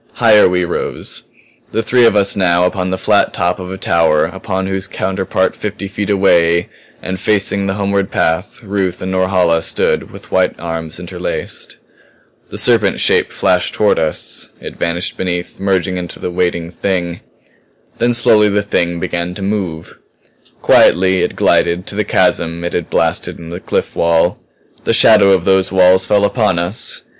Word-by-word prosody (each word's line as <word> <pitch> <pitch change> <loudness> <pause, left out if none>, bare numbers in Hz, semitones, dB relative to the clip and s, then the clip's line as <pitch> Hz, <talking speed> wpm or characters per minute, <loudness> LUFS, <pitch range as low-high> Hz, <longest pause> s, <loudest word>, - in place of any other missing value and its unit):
Higher 105 -3 +5
we 90 0 0
rose; 85 - -3 0.5
the 115 - -1
three 120 +1 +4
of 105 - +2
us 100 -1 +3
now 90 -3 +2
upon 90 0 -2
the 95 - -2
flat - - +1
top 90 +2 -1
of 90 0 -7
a 95 - -6
tower 80 -5 +2
upon 95 +2 -4
whose 95 0 -3
counterpart 95 -1 -2
fifty 105 -1 -5
feet 100 +1 -4
away 85 -4 +2 0.3
and 95 0 -4
facing 100 -1 +1
the 95 - -2
homeward 100 -1 -1
path, 80 +8 -2
Ruth 95 -3 -2
and 95 - -3
Norhala 95 -3 +1
stood - - 0
with - - -13
white - - +1
arms 80 -1 -5
interlaced. - - -6 0.7
The - - -7
serpent 110 -5 +3
shape - - +2
flashed 90 -1 0
toward 105 -1 +2
us; 80 -1 -2
it - - -9
vanished 85 +2 -3
beneath, 90 -1 -4
merging 95 -1 -1
into 90 -1 -6
the 90 - -5
waiting 85 -1 -2
Thing. 85 -2 -3 0.8
Then 120 +1 +2
slowly 105 -2 +4
the 100 0 0
Thing 85 -3 -1
began 85 +1 -3
to 100 - -6
move; 95 -6 -4 0.6
quietly 95 0 +4
it - - -1
glided 85 +2 +1
to - - -6
the 105 - 0
chasm 85 -3 0
it 85 - -4
had 85 - -3
blasted - - -1
in 85 -1 -10
the 85 +1 -6
cliff - - -3
wall. 85 +1 +1 0.4
The - - +1
shadow 105 -3 +5
of 95 -3 +2
those 95 -1 +2
walls 95 0 +4
fell 100 -1 +3
upon 105 -5 +1
us. 85 +6 -2
95 Hz, 170 wpm, -15 LUFS, 85-100 Hz, 0.8 s, Higher